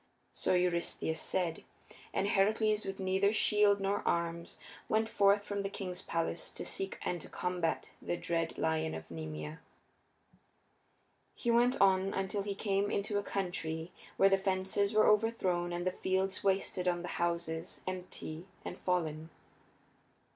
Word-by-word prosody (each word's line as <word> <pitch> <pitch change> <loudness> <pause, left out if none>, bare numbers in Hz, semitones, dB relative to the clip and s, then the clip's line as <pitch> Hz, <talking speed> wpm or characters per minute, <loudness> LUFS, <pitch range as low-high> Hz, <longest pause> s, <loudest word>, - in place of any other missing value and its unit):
So - - +1
Eurystheus 170 -2 0
said, 170 -3 -1 0.5
and 200 - 0
Heracles, 215 +2 +2
with 195 0 -4
neither 190 +1 +2
shield 210 -2 +4
nor 195 +1 0
arms, 170 0 -1 0.3
went 220 +1 +2
forth 200 -1 +4
from 200 0 -3
the 195 - -2
king's 185 -2 -5
palace 165 -1 -2
to - - -6
seek 195 0 -2
and 175 -2 -2
to - - -10
combat 180 -2 -2
the 175 - -2
dread 165 -1 -1
lion 160 0 0
of 80 +1 -8
Nemea. 80 -1 -6 1.8
He 235 - 0
went 240 +2 +4
on 190 0 +4
until 195 +1 -1
he 200 0 -3
came 200 0 0
into 205 0 0
a - - -1
country 175 -4 -3 0.3
where 195 - +7
the 195 - +4
fences 190 +1 +1
were 215 -1 +5
overthrown 200 -5 +2
and 175 +1 -3
the 185 - +2
fields 190 +2 -1
wasted 190 -2 +1
and 175 -1 +1
the - - -4
houses 170 0 -2
empty 180 -2 -6 0.2
and - - -6
fallen. 160 -3 -1
185 Hz, 145 wpm, -33 LUFS, 170-200 Hz, 1.8 s, where